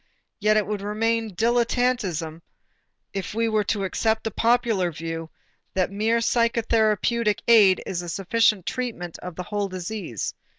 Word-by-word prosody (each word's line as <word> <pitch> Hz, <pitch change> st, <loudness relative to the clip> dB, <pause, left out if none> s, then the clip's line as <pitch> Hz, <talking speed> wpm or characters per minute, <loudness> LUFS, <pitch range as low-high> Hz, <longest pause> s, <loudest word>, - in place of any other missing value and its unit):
Yet 215 Hz, 0 st, +3 dB
it 210 Hz, -, +2 dB
would 210 Hz, -1 st, -3 dB
remain 220 Hz, 0 st, -1 dB
dilettanteism 230 Hz, -8 st, 0 dB, 0.7 s
if 195 Hz, +1 st, -4 dB
we 230 Hz, 0 st, +1 dB
were 215 Hz, -1 st, +1 dB
to 205 Hz, -1 st, -1 dB
accept 220 Hz, +3 st, 0 dB
the 225 Hz, -, -2 dB
popular 225 Hz, -6 st, +2 dB
view 165 Hz, +1 st, -5 dB, 0.5 s
that 185 Hz, -1 st, +1 dB
the -, -, -9 dB
mere 220 Hz, +3 st, +2 dB
psychotherapeutic 230 Hz, -2 st, +2 dB
aid 210 Hz, -5 st, +6 dB
is 175 Hz, -2 st, -3 dB
a 175 Hz, -, -7 dB
sufficient 205 Hz, +1 st, +1 dB
treatment 225 Hz, -10 st, -4 dB
of 180 Hz, -2 st, -8 dB
the 180 Hz, -, -5 dB
whole 205 Hz, +2 st, -2 dB
disease. 185 Hz, -, -5 dB
210 Hz, 145 wpm, -24 LUFS, 185-230 Hz, 0.7 s, aid